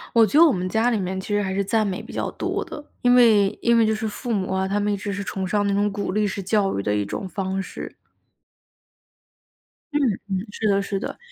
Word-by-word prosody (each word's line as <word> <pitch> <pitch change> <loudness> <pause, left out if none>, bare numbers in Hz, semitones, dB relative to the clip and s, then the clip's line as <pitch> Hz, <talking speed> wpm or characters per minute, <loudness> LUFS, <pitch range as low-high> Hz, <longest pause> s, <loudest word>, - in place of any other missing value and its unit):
我 230 -1 +7
觉 280 - +2
得 - - +10
我 320 - +5
们 185 -1 -2
家 225 +5 +2
里 225 - +1
面 190 0 -3
其 - - -9
实 205 0 +1
还 190 -1 -2
是 200 - +1
赞 215 +2 +1
美 190 -2 -3
比 - - -11
较 - - -2
多 - - -2
的。 295 - -9 0.2
因 245 0 +5
为 215 -5 +5
因 235 0 +4
为 225 - +4
就 220 - +2
是 220 +1 -3
父 235 +3 -4
母 190 -3 -1
啊， 190 0 0
他 200 +1 0
们 205 0 0
一 205 - 0
直 200 +1 -4
是 200 0 -3
崇 190 -1 -3
尚 205 +2 +1
那 200 - +1
种 205 +1 +1
鼓 200 -1 -3
励 210 +1 +1
式 200 0 -3
教 195 0 +1
育 - - -1
的 105 +1 0
一 105 -1 0
种 185 - -5
方 190 0 -2
式。 - - -8 2.0
嗯 295 - +2 0.3
嗯， 190 +2 -2
是 215 +1 -1
的 200 -1 +3
是 195 0 -3
的。 - - -5
200 Hz, 275 characters per minute, -23 LUFS, 190-220 Hz, 2.0 s, 得